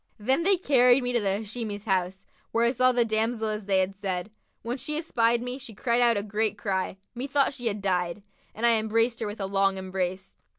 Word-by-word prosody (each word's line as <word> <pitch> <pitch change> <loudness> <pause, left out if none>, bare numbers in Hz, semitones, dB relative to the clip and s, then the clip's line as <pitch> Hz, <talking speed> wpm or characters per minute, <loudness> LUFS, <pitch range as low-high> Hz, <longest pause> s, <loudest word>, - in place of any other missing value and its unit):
Then 260 +9 +1
they 385 +2 +4
carried 255 -6 +4
me 245 0 -1
to 240 - +3
the 200 0 -1
Hashimi's 215 -1 -5
house, 190 -2 -1 0.3
where 230 +1 +2
I 235 - +3
saw 255 0 +3
the 240 -1 +2
damsel 220 0 0
as 210 -1 -4
they 195 -1 +3
had 190 +1 0
said. 195 0 -3 0.3
When 240 +3 -3
she 300 +4 -3
espied 235 -7 +1
me, 250 +2 -5
she 245 -5 -9
cried 235 +2 +1
out 235 -2 +4
a 200 - -1
great 215 0 -1
cry, 190 -2 -2 0.2
methought 275 +3 0
she 245 -3 -4
had 205 -2 -2
died, 180 0 -1 0.3
and 225 - -1
I 235 -1 +5
embraced 225 +2 +1
her 220 - -2
with 205 +1 -7
a 195 - -2
long 195 0 +1
embrace. 185 0 -4
220 Hz, 220 wpm, -27 LUFS, 195-245 Hz, 0.3 s, I